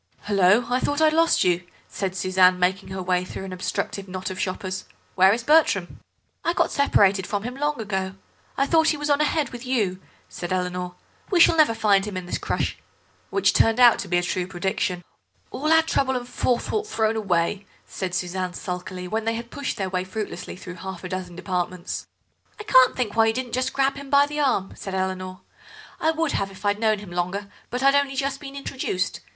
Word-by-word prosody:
"Hullo, 205 +3 +4
I 250 - +3
thought 290 +3 -1
I - - +3
had 310 0 +5
lost 330 +1 +4
you," 175 -1 +2 0.2
said 190 -2 -4
Suzanne, 185 -1 +4
making 180 +2 0
her 190 0 -4
way 180 0 +1
through 185 - -7
an 190 - -6
obstructive 190 +2 -3
knot 185 0 -5
of 185 - -7
shoppers. 185 0 -3 0.3
"Where 190 +1 +6
is 230 +3 -1
Bertram?" 290 - +3 0.4
"I 335 - +1
got - - +1
separated 200 -9 +3
from 205 -1 -2
him 245 +2 -4
long 295 0 -1
ago. 190 -3 -3 0.4
I 275 - +3
thought 320 +2 +3
he 305 - +2
was 295 0 -1
on 285 +1 +3
ahead 300 -2 +1
with 245 0 -8
you," 210 -8 -1 0.3
said 175 - -7
Eleanor. 180 -1 -2 0.3
"We 365 - +2
shall 335 - +7
never 305 -8 +4
find 200 -3 +3
him 205 -3 -5
in 185 - -5
this 175 - -3
crush." - - -2 0.5
Which 395 - +2
turned 225 +2 +3
out 240 -2 +7
to - - -4
be 175 -1 +1
a 175 - +1
true 180 0 -2
prediction. 185 0 -2 0.5
"All 305 +4 -1
our 320 0 +6
trouble 265 -4 +1
and 245 0 -6
forethought 255 - -1
thrown 220 - 0
away," 195 -1 0 0.2
said 185 -2 -4
Suzanne 185 0 -2
sulkily, 180 0 -5
when 220 +3 -2
they 225 0 0
had 235 +1 -7
pushed 285 -2 -4
their 195 - -1
way 185 -1 0
fruitlessly 200 +3 -6
through 180 -1 -10
half 190 -2 -7
a 180 - -5
dozen 185 -2 -5
departments. 180 0 -3 0.5
"I - - -6
can't 260 -11 +5
think 230 -5 -2
why 225 0 +5
you 220 - +2
didn't 255 +1 -2
grab 275 0 +1
him 280 -1 -9
by 280 0 +5
the 295 +1 -5
arm," 255 -9 +1
said 195 -1 -6
Eleanor; 185 -1 -3 0.6
"I 320 - +2
would 320 -1 0
have 195 - -1
if 190 0 -12
I'd 205 0 +1
known 220 -1 +2
him 200 -3 -10
longer, 180 +3 -3 0.2
but 250 +2 -3
I'd 275 0 +6
only 280 -1 +2
just 275 0 -1
been 275 -1 -9
introduced. 260 -9 -3
205 Hz, 210 wpm, -24 LUFS, 185-265 Hz, 0.6 s, shall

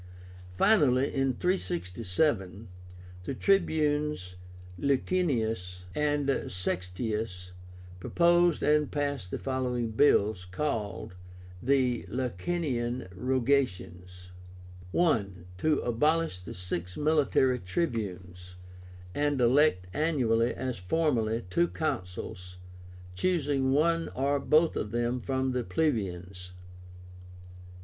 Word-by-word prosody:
Finally, 140 - +4
in 135 -1 +1
367, 95 - -1 0.6
the 135 - -3
Tribunes 150 - +1 0.5
Licinius 115 - 0
and 145 -2 0
Sextius 90 +1 -3 0.5
proposed 175 - +3
and 150 0 +3
passed 145 -9 -2
the - - -3
following 125 -3 -2
bills, 110 -6 +3
called 100 -4 -3 0.5
the 130 -1 +1
LICINIAN 125 - -2
ROGATIONS. 95 -7 -1 0.6
I. 155 - +3 0.3
To 155 +3 +2
abolish 150 - +1
the 90 -2 -9
six 90 0 -4
military 145 -4 +2
tribunes, 90 - -4 0.6
and 145 -1 0
elect 125 -6 +4
annually, 125 -7 +1
as 130 -4 -4
formerly, 115 - 0
two 170 - +3
Consuls, 90 - -5 0.6
choosing 140 - +1
one 165 +4 +2
or 140 +2 +1
both 155 +4 +3
of 105 - -2
them 120 +2 -1
from 130 +1 -1
the 125 -1 -1
plebeians. 95 - -2
125 Hz, 90 wpm, -29 LUFS, 95-150 Hz, 0.6 s, Finally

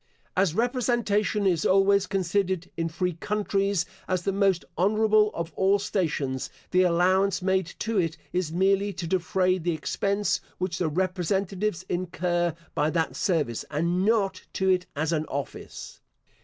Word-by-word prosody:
As 185 -3 +2
representation 230 -4 +1
is 175 -5 +2
always 195 +1 +4
considered, 190 -1 -1
in 165 0 -1
free 180 +2 -1
countries, 200 +1 0 0.2
as 185 -1 -1
the 195 - 0
most 195 -3 +2
honourable 215 +2 +3
of 170 0 -4
all 195 +1 +3
stations, 155 -10 -2 0.2
the 185 - +4
allowance 185 +2 +2
made 190 -2 +1
to 225 -2 0
it 165 -2 -1 0.2
is 180 -3 -1
merely 195 +3 +2
to 175 -1 -5
defray 185 +1 +1
the 170 0 -1
expense 200 +7 -1 0.2
which 180 -2 -2
the 175 - +1
representatives 185 +2 -1
incur 175 -1 -1 0.2
by 150 +1 +1
that 165 0 -1
service, 155 - 0
and 170 +5 0
not 200 -3 +1
to 190 0 +1
it 180 -1 +2
as 155 +3 0
an 155 -1 0
office. 140 0 -6
185 Hz, 145 wpm, -26 LUFS, 170-200 Hz, 0.2 s, always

